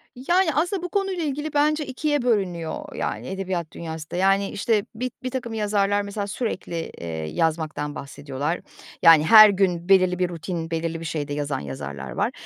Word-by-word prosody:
Yani, 335 +6 +2
aslında 350 +5 0
bu 360 - -3
konuyla 390 -4 -1
ilgili 295 +1 -3
bence 300 +1 +2
2'ye 290 +1 -1
bölünüyor, 180 -9 -1
yani, - - -3
edebiyat 185 -4 -3
dünyası 160 -2 -7
da. - - -4
Yani, 195 +2 +2
işte, 210 0 0
bi 250 +2 -3
birtakım 255 -2 -4
yazarlar 205 -2 +1
mesela 200 0 -4
sürekli, 195 -6 -4
eee, 85 - -6 0.2
yazmaktan 150 - -1
bahsediyorlar. 140 +3 -4 0.4
Yani, 165 -3 +8
her 215 +3 +10
gün 185 -3 0
belirli 185 -2 +4
bir 180 -1 +1
rutin, 165 0 -5
belirli 165 0 -2
bir 165 - -7
şeyde 150 -2 -3
yazan 145 -1 -2
yazarlar 70 -1 -6
var. - - 0
190 Hz, 165 wpm, -24 LUFS, 160-240 Hz, 0.4 s, her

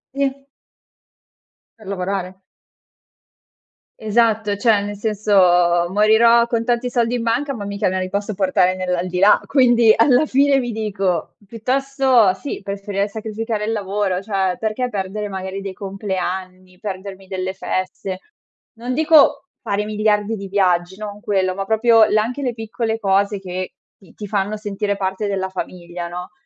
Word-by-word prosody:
Sì. 275 0 -2 1.3
Per 215 - -15
lavorare. 190 -1 -3 1.6
Esatto, 220 -1 +1
cioè 215 -2 +3
nel 205 0 -5
senso, 180 -5 +3
morirò 220 +4 +5
con 230 -1 -1
tanti 240 +1 0
soldi 240 -1 0
in 235 - -2
banca, 275 +5 0
ma 220 -5 -6
mica 200 0 -2
me 185 0 -1
li 185 - -3
posso 205 +2 -2
portare 185 -1 +2
nell'aldilà, 180 +1 +2
quindi 240 -5 +5
alla 250 +4 +4
fine 275 -1 +3
mi 240 -3 -3
dico 195 -5 -2
piuttosto 255 -2 +2
sì, 285 - -6
preferirei 200 0 -3
sacrificare 220 +1 -4
il 220 - -1
lavoro, 200 -3 -1
cioè 190 -3 -1
perché 225 +3 -2
perdere 205 0 -4
magari 190 0 -5
dei 195 -1 -5
compleanni, 185 -2 -5
perdermi 195 0 -7
delle 190 0 -4
feste. 185 0 -4 0.5
Non 245 +2 -5
dico 310 -1 +4 0.2
fare 210 -2 -2
miliardi 215 0 0
di 195 -1 -7
viaggi, 185 -1 +1
non 210 -1 -7
quello, 190 -3 0
ma 195 - -2
proprio 225 +2 +4
la 215 0 +3
anche 250 +6 -4
le 250 -3 -1
piccole 225 0 -3
cose 200 0 +1
che 185 -1 -6 0.2
ti 190 - -20
ti 210 - -8
fanno 205 +1 -1
sentire 205 -1 -3
parte 190 +2 -2
della 190 -1 -1
famiglia, 175 -2 -6
no, 180 +1 -7
205 Hz, 145 wpm, -20 LUFS, 190-225 Hz, 1.6 s, morirò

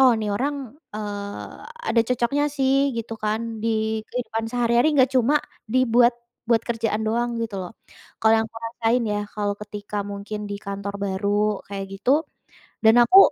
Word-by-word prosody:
"Oh 260 -2 +7
ini 215 -1 -2
orang," 275 +2 -3 0.2
eee, 205 -1 -5 0.4
"ada 230 - +5
cocoknya 250 +4 +1
sih." 275 0 +2
Gitu 225 0 -4
kan. 220 +1 -2
Di 220 -1 0
kehidupan 225 -2 -3
sehari-hari 240 +4 +3
enggak 260 0 +4
cuma 255 +4 +4 0.3
dibuat 245 0 +4 0.3
buat 230 -1 +4
kerjaan 225 -2 -1
doang 235 +1 0
gitu 225 -3 -3
loh, 180 - -8 0.5
kalau 220 0 +4
yang - - -4
aku 225 - -9
rasain 235 +1 +1
ya, 210 0 -1
kalau 205 -1 -1
ketika 205 0 -5
mungkin 205 +1 -6
di 200 - -2
kantor 200 0 -5
baru 200 +1 0
kayak 195 -1 -4
gitu 285 +9 +3 0.6
dan 225 +2 +7
aku 380 +11 +8
225 Hz, 160 wpm, -24 LUFS, 210-245 Hz, 0.6 s, aku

